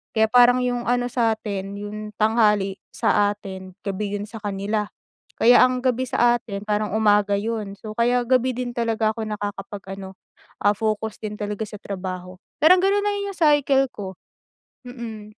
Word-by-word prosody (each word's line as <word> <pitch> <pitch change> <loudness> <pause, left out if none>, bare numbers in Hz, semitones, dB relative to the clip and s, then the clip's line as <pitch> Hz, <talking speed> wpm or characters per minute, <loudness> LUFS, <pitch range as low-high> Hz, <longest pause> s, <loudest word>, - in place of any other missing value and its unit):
kaya 220 0 +4
parang 245 0 +6
yung 245 -1 -1
ano 245 0 +1
sa'tin 215 -5 -1
yung 210 +1 -6
tanghali 210 -3 +2 0.2
sa 205 - +3
atin 190 -2 -9
gabi 200 +1 -2
'yon 205 - -5
sa 225 +1 -9
kanila 205 +1 -2 0.5
kaya 245 +2 +7
ang 255 0 +1
gabi 255 -1 +1
sa 240 0 +3
atin 200 -4 -7
parang 210 0 0
umaga 210 -2 +3
'yon 215 -2 -3
so, 215 +1 -7
kaya 245 +1 +2
gabi 255 0 +3
din 250 -1 -3
talaga 225 -2 +1
ako 225 - -3
nakakapag-ano, 195 -2 -6 0.5
ah, 205 0 +4
focus 215 0 -2
din 210 -1 -4
talaga 210 +1 -3
sa 210 - -9
trabaho. 185 -2 -6 0.2
Parang 350 +5 +7
gano'n 400 +1 +3
na 410 - +2 0.2
yung - - -16
cycle 290 -4 +4
ko, 190 -2 -7 0.7
mm. 235 -4 -7
215 Hz, 160 wpm, -23 LUFS, 205-240 Hz, 0.7 s, kaya